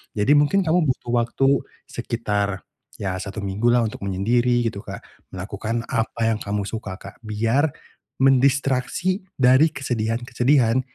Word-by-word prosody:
Jadi 105 +6 +2
mungkin 170 +7 +3
kamu 165 -2 +2
butuh 125 -2 -2
waktu 120 +3 +1 0.4
sekitar, 105 -4 -2 0.3
ya 95 -2 -3
1 105 +2 -6
minggu 100 +4 -1
lah 120 0 +4
untuk 110 - -4
menyendiri 120 +6 +1
gitu, 115 -3 -2
Kak, - - -8 0.3
melakukan 105 +5 -4
apa 115 -2 -2
yang 115 -1 +1
kamu 105 -1 -2
suka, 105 -2 -5
Kak, 100 0 -12
biar 115 +7 +1 0.5
mendistraksi 135 +7 +2
dari 130 +4 +5
kesedihan-kesedihan 120 +1 +1
115 Hz, 130 wpm, -22 LUFS, 105-130 Hz, 0.5 s, dari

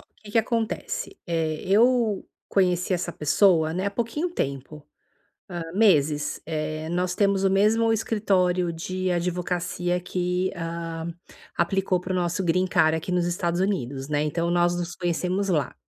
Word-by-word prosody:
o - - -26
que 210 -1 -11
que - - +4
acontece? 250 - -2
Eh, 160 -2 -1
eu 225 +1 +3 0.3
conheci 180 -1 +2
essa 175 -1 -1
pessoa, 160 +1 +3
né, 185 +4 -2
há - - 0
pouquinho 235 - -2
tempo, 145 - -4 0.6
hã, 175 -3 -4
meses. 150 -8 +3
Eh, 155 0 -3
nós 180 +1 -1
temos 195 0 +2
o 195 - +4
mesmo 220 +4 +3
escritório 185 -5 +1
de 185 +3 -3
advocacia 180 0 -1
que, 180 +1 -1
hã, 165 0 -4 0.4
aplicou 185 +1 +1
para 180 +1 -4
o - - +1
nosso 175 +1 0
green 185 +2 +2
card 160 -3 +3
aqui 160 +3 -4
nos 180 -1 +1
Estados 175 0 -1
Unidos, 140 -9 -2
né. 150 -1 +1
Então 170 +3 -1
nós 175 0 +3
nos 175 0 -4
conhecemos 180 +3 -1
lá. 155 -5 0
180 Hz, 155 wpm, -25 LUFS, 165-195 Hz, 0.6 s, que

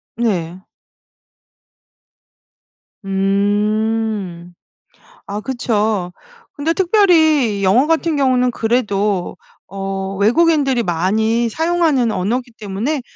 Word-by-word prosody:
네. 185 -7 -2 2.5
음. 205 -1 -1 0.7
아 205 +1 -4
그쵸. 215 -7 -1 0.4
근데 300 +2 -1
특별히 320 - +3
영어 210 +9 +4
같은 325 0 +1
경우는 255 -3 +2
그래도 210 -5 -1 0.3
어 195 0 -5
외국인들이 270 - +2
많이 220 +7 0
사용하는 320 -4 +1
언어기 240 +6 -2
때문에 220 +9 -3
220 Hz, 175 characters per minute, -17 LUFS, 195-265 Hz, 2.5 s, 영어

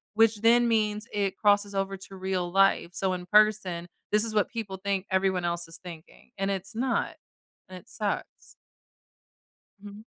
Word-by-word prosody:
which 225 -1 +4
then 235 +1 +5
means 215 -1 0
it 200 -2 -1
crosses 205 -1 +2
over 195 0 -1
to 195 0 -12
real 185 -2 -2
life. 195 -2 +3
So 190 -1 0
in 180 -1 -5
person, 210 -4 +3 0.2
this 210 +1 +3
is 220 - -4
what 210 - +2
people 210 -5 -5
think 195 0 -2
everyone 190 -2 +1
else 170 0 -2
is 165 - -8
thinking, 170 -2 -13
and 195 0 -1
it's 195 +1 -4
not, 255 +3 -1 0.5
and 185 - -8
it 180 - -15
sucks. 210 -2 -4 1.2
Mhm. 205 +2 -11
195 Hz, 165 wpm, -27 LUFS, 185-210 Hz, 1.2 s, then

